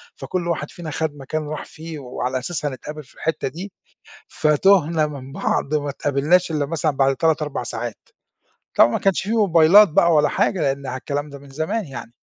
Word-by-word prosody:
فكُل 175 -2 -4
واحد 155 -3 -2
فينا 165 -3 -7
خد 160 -1 -2
مكان 150 +2 -4
راح 155 - -5
فيه، 160 -1 -9
وعلى 130 0 -3
أساسه 150 +2 -3
هنتقابل 150 +3 -8
في 130 - -22
الحِتّة 160 - -2
دي، 180 +8 -7 0.6
فتُهنا 155 0 +3
من 135 -2 -8
بعض 140 - -1
وما 145 -1 0
اتقابلناش 145 +6 +1
إلّا 150 -3 0
مثلًا 155 0 0
بعد 135 -1 +2
3، 160 0 +2
4 150 -4 -3
ساعات. 120 -1 -6 0.7
طبعًا 115 - +6
ما - - -1
كانش 195 -2 +1
في 205 - -3
موبايلات 200 -1 +6
بقى 170 +2 +4
ولا 150 -1 +4
حاجة 185 - 0
لأن 140 -1 -1
ع 130 0 -3
الكلام 145 +2 -4
ده 140 -1 -10
من 140 0 -15
زمان 165 +9 -2
يعني. 130 -4 -9
150 Hz, 190 wpm, -21 LUFS, 140-165 Hz, 0.7 s, طبعًا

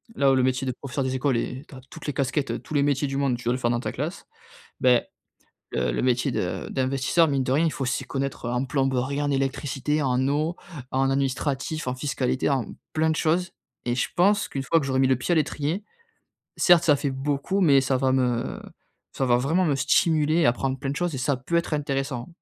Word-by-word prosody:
Là 140 -6 +4
où - - +4
le 130 - +3
métier 130 +1 0
de - - +1
professeur 140 +1 -4
des 130 0 -1
écoles 130 -1 +1
est 125 +3 -4
tu 140 - -12
as 130 - -10
toutes - - -9
les 145 - -1
casquettes, 140 +1 -1
tous - - -9
les 145 - +4
métiers 145 0 +1
du 135 0 -3
monde, 135 -3 +1
tu 120 - -11
dois 120 - +2
le 130 - -2
faire 120 - +1
dans 120 - 0
ta - - -3
classe. 160 +9 -4 0.6
Beh, 125 -2 +5 0.7
le 60 -1 0
le - - -1
métier 125 +1 +1
de 90 -5 -3
d'investisseur, 135 +5 +2
mine 140 -2 +1
de 125 - -2
rien 150 +5 +3
il 160 - 0
faut 135 - -3
s'y 130 - -1
connaître 135 -3 -3
en 125 +2 0
plomberie, 135 +1 0
en 145 - 0
électricité, 135 +2 -1
en 130 0 +1
eau, 155 +4 0 0.4
en 135 0 +2
administratif, 135 +2 -1
en 125 - -1
fiscalité, 130 -1 -1
en 130 -5 -1 0.2
plein 160 0 +2
de 160 - 0
choses 170 +3 +1 0.4
et 120 - +1
je 125 - 0
pense 200 +4 +3
qu'une 135 - -4
fois 165 - +3
que 135 - -4
j'aurai 130 -1 +1
mis 135 - +4
le 130 - +3
pied 130 +8 -2
à 170 - +3
l'étrier, 155 +4 -1 0.7
certes 175 -2 +5
ça 150 - +5
fait 140 0 -2
beaucoup 140 +8 -1
mais 140 -5 +6
ça 130 0 +1
va 130 -1 +2
me 125 -3 0 0.5
ça 135 - -1
va 120 -1 +4
vraiment 160 +9 +1
me 145 - +2
stimuler, 155 +3 +3
apprendre 130 +2 0
plein 135 - -3
de 140 - -4
choses 175 0 -1
et 130 - -3
ça 130 +1 0
peut 150 +7 -2
être 170 -2 0
intéressant. 135 -4 -2
135 Hz, 235 wpm, -25 LUFS, 130-150 Hz, 0.7 s, mais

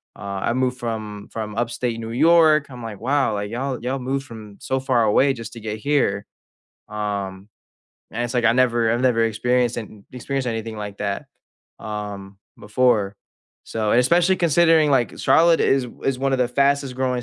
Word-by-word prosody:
uh, 100 -1 -6
I - - +1
moved 130 0 0
from 110 -3 -5
from 110 -2 -5
Upstate 120 0 -2
New 115 0 -6
York." 155 +2 +4
I'm 125 -2 -10
like, 105 -3 -7
"Wow, 135 -1 +1
like, 105 0 -4
y'all 130 +2 -3
y'all 130 +2 -2
moved 135 +2 -3
from 110 -4 -11
so 130 - -1
far 130 -3 +1
away 130 +6 +3
just 115 -3 -8
to 115 - -9
get 110 0 -5
here." 120 -7 0 0.6
Um, 100 -2 -4 0.6
and 120 +2 -3
it's 120 - -5
like, 120 - +1
I 115 - +5
never 120 -2 +2
I've 120 - 0
never 115 -3 +3
experienced 120 +2 0
an 110 - -5
n 105 -2 -16
experienced 130 +1 -3
anything 115 -1 -4
like 105 -1 -7
that, 100 -1 -3 0.5
um, 100 -2 -7 0.2
before, 105 -2 +1 0.5
so 110 -2 -1
and, 120 - +5
especially, 175 +8 +3
considering, 165 -2 +4
like, 130 -4 +1
Charlotte 165 0 +4
is 135 -2 +2 0.2
is 135 -2 0
one 135 +1 0
of 130 - +1
the 125 - +2
fastest-growing 130 -2 0
120 Hz, 180 wpm, -22 LUFS, 105-135 Hz, 0.6 s, I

